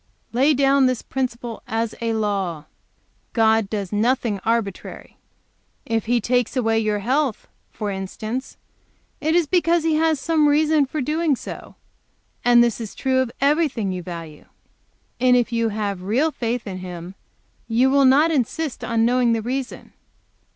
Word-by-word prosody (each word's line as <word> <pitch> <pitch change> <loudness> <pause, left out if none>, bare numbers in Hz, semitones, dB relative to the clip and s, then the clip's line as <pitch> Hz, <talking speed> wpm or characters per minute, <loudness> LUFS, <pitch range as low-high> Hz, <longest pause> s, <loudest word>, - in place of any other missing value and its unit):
Lay 275 +5 +3
down 275 0 +4
this 255 -2 -1
principle 240 -3 -4
as 225 0 -2
a 230 -1 0
law 195 -8 -2 0.7
God 220 -2 +3
does 200 -4 -4
nothing 225 -1 +1
arbitrary. 225 -4 -3 0.7
If 225 -1 -1
He 240 +1 +2
takes 245 +3 0
away 225 -2 +2
your 215 -1 0
health, 255 +3 -1 0.2
for 210 -1 -4
instance, 215 +6 -5 0.6
it 315 +2 0
is 345 -2 +4
because 340 0 +2
He 325 -1 +1
has 320 -2 +2
some 310 +1 +2
reason 300 -1 +3
for 300 +2 -3
doing 305 +2 +1
so; - - -9 0.7
and 240 -1 +6
this 235 -1 -1
is 220 - -7
true 260 -1 +1
of 260 -2 0
everything 280 - +1
you 180 -1 -4
value; 165 -3 -9 0.7
and 250 0 +4
if 245 -1 0
you 230 -1 +1
have 205 -3 -3
real 245 +12 +1
faith 240 -3 -3
in 185 -2 -6
Him 180 0 -8 0.5
you 245 +3 +3
will 280 0 +4
not 290 +5 +5
insist 295 +1 -2
on 230 -1 +1
knowing 245 -1 +3
this 225 -1 -2
reason. 260 +1 -5
240 Hz, 155 wpm, -22 LUFS, 215-275 Hz, 0.7 s, and